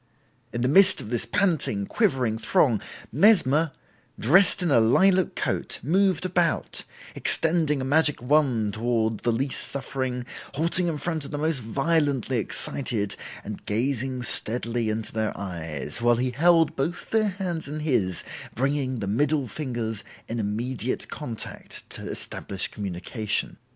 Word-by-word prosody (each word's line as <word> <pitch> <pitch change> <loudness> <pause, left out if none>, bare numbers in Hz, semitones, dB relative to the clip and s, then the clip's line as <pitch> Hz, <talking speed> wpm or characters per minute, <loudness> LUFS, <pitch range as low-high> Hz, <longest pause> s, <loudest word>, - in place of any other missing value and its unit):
In 120 - -3
the 125 - +2
midst 190 +6 +6
of 105 - -7
this 120 - -1
panting, 160 - +1
quivering 130 - 0
throng, 115 - +2 0.3
Mesmer, 160 - +4 0.5
dressed 180 - +4
in 170 - 0
a 125 - +5
lilac 185 +11 +3
coat, - - -2
moved 185 +3 +2
about, 175 -2 0 0.3
extending 160 -3 +2
a - - -3
magic 150 +2 +4
wand 125 -6 +1
toward 110 -1 0
the 120 - 0
least 130 +4 0
suffering, 130 -2 -3 0.3
halting 170 +4 +2
in 160 -3 -2
front 160 +1 -2
of 140 - -6
the 145 - -4
most 155 -1 0
violently 135 +1 0
excited 110 -1 -1 0.3
and 105 0 -7
gazing 130 +3 -1
steadily 115 0 +2
into 110 0 -3
their 110 -1 -2
eyes, 85 - -4
while 120 0 +4
he 125 +2 -1
held 165 +4 +3
both 165 +6 -3
their 220 -1 +2
hands 180 -5 -4
in 150 +2 -5
his, 105 - +1 0.3
bringing 130 -1 -1
the 100 - -3
middle 140 +6 +1
fingers 115 -5 -4 0.2
in 115 +1 -4
immediate 115 +4 -2
contact 120 -7 -6
to - - -5
establish 95 -2 -3
communication. 105 +2 -3
130 Hz, 140 wpm, -25 LUFS, 115-160 Hz, 0.5 s, midst